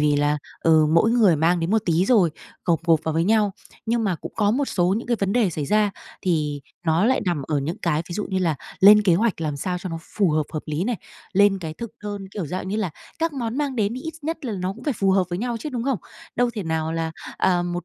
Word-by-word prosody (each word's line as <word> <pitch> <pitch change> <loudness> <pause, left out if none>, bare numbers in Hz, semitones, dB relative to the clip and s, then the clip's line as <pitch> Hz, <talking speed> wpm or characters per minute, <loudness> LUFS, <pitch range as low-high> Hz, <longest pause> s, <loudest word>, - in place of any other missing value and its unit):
vì 150 -1 +3
là, 145 +1 +2 0.2
ừ, 160 -1 +5
mỗi 170 +8 +4
người 215 -9 +4
mang 170 +3 +2
đến 165 +3 -1
một 220 -1 +3
tí, 170 +1 +2
rồi 195 -7 +4 0.3
gộp 170 -3 +2
gộp 165 -3 +4
vào 160 -1 -1
với 165 +1 +2
nhau. 210 -1 +3 0.3
Nhưng 230 0 +1
mà 190 -4 +1
cũng - - -9
có 205 -2 +3
một 275 +6 +1
số 180 -5 +1
những 235 - -7
cái 240 -1 +1
vấn 195 0 +1
đề 225 -5 +3
xảy 150 -3 -3
ra 210 -1 +3 0.3
thì 150 -5 0 0.3
nó 165 +4 +3
lại 260 +3 +3
nằm 170 -6 0
ở 150 0 -1
những 165 +9 -3
cái, 160 -2 +1
ví - - -6
dụ 210 - -2
như 190 - +1
là 170 -4 +1 0.3
lên 210 +2 +8
kế 180 -4 +4
hoạch 210 -1 +1
làm 150 -3 -2
sao 180 +5 -2
cho 185 - -6
nó 165 -1 -4
phù 195 -2 0
hợp, 155 0 +2
hợp 155 - -3
lý 155 +4 -1
này, 240 0 -1 0.4
lên 200 0 +4
cái 160 -3 -6
thực 235 +2 -6
đơn, 205 -2 -5
kiểu, 195 -6 -4
dạng 185 +4 -4
như 205 - -1
là 200 -6 -1 0.3
các 330 0 0
món 240 -3 -3
mang 280 -3 -1
đến 210 0 +1
thì 255 - -5
ít 320 -1 -5
nhất 325 -1 -4
là 230 - -2
nó 185 0 -2
cũng - - -13
phải 290 - +1
phù 195 -3 +1
hợp 190 -1 +3
với 175 - -2
nhau 240 +1 -2
chứ, 230 - -5
đúng 245 -3 -3
không? 270 -7 0 0.4
Đâu 245 - +3
có - - -2
thể 210 - -3
nào 160 -1 -1
là, 165 0 -2 0.3
ờ, 180 -2 +2
một 175 0 -3
190 Hz, 280 wpm, -23 LUFS, 165-220 Hz, 0.4 s, lên